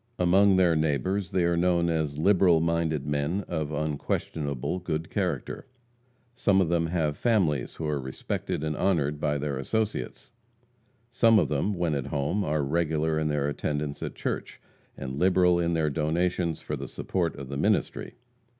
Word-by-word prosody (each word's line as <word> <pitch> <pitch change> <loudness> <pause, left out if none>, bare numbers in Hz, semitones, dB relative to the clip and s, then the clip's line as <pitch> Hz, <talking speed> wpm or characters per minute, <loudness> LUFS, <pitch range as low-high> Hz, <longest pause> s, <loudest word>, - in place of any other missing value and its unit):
Among 95 +2 +4
their 90 -3 +4
neighbors 80 +5 0
they 90 - +1
are 85 0 +2
known 85 0 +2
as 80 -3 -1
liberal 90 0 +4
minded 80 -3 0
men 75 +7 -1
of 75 -1 -3
unquestionably 75 0 -2
good 80 -1 -3
character. - - -3 0.7
Some 100 -5 +2
of 90 -4 +2
them 85 -1 +1
have 80 -3 0
families 90 - +1
who 80 - -5
are 75 -2 -1
respected 65 +3 -4
and 75 -1 -1
honored 75 -6 0
by 75 -1 0
their 70 -2 -3
associates. 110 - -3 0.8
Some 115 -2 +5
of 100 - +2
them, 75 +8 0
when 85 -3 0
at 70 -3 -2
home, 75 +8 -1
are 75 -2 0
regular 80 +1 0
in 80 - 0
their 75 -1 0
attendance 75 0 -3
at - - -5
church, - - -4 0.4
and 65 +1 -5
liberal 90 -1 +4
in 85 0 +1
their 80 -2 +1
donations 85 +2 0
for - - -4
the - - -6
support 85 -4 -2
of 70 -1 -8
the 70 - -4
ministry. 95 - 0
80 Hz, 165 wpm, -27 LUFS, 75-90 Hz, 0.8 s, Some